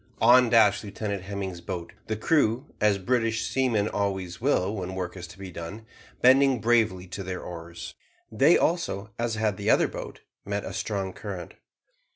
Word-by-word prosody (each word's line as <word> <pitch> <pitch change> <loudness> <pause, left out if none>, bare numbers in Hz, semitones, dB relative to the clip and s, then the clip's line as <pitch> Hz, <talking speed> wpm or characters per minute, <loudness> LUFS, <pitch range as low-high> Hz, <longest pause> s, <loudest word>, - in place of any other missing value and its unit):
On 120 +1 +6
dashed 110 -4 +5
Lieutenant 100 -1 -4
Hemming's 95 -2 -5
boat, 85 -1 -6
the 110 - -1
crew, 130 -1 +2 0.2
as 105 -1 +4
British 115 +2 0
seamen 120 -6 +1
always 95 -4 -2
will 110 -7 +1
when 95 0 -4
work 90 -1 -4
is 90 -2 -7
to 90 - -14
be 95 -1 -8
done, 90 +7 -8 0.4
bending 130 0 +6
bravely 110 -5 +2
to 95 - -5
their 95 -1 -5
oars. 85 -1 -8 0.4
They 135 +10 +5
also, 110 - -1
as 120 -1 -1
had 110 -3 0
the 100 +1 -2
other - - +5
boat, - - -8 0.2
met 100 0 -3
a - - -6
strong 95 -3 -3
current. 95 -5 -7
100 Hz, 170 wpm, -26 LUFS, 95-115 Hz, 0.4 s, On